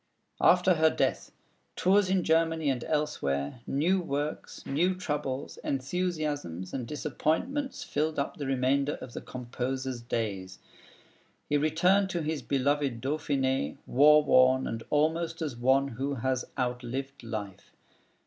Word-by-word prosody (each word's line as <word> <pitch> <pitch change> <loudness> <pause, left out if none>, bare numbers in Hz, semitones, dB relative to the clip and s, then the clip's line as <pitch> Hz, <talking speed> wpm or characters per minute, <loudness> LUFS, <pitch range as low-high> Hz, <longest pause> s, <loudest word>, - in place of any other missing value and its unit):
After 180 +1 +5
her 160 -1 +4
death, - - -1 0.4
tours 190 +1 +3
in 190 -1 +2
Germany 160 -2 +2
and 125 -3 -3
elsewhere, 120 - -1
new 170 +8 +2
works, 145 -2 -4
new 175 +7 +1
troubles, 145 -6 -3
enthusiasms, 145 - -2
and 125 -3 -3
disappointments 160 - -2
filled 155 +2 -1
up 140 - -2
the 145 - -4
remainder 135 +2 +1
of 120 - -10
the - - -6
composer's 130 0 -4
days. 100 -6 -3 0.9
He 145 - 0
returned 180 +6 +3
to 175 -3 -2
his 155 -2 -2
beloved 140 -1 0
Dauphiné, 135 - -1
war 150 +3 +6
worn 130 -2 +5
and 115 - -4
almost 165 +2 +1
as 150 -7 -3
one 130 +3 +3
who 135 +3 -3
has 130 0 -1
outlived 125 +2 -3
life. 105 -5 -6
140 Hz, 130 wpm, -29 LUFS, 130-160 Hz, 0.9 s, war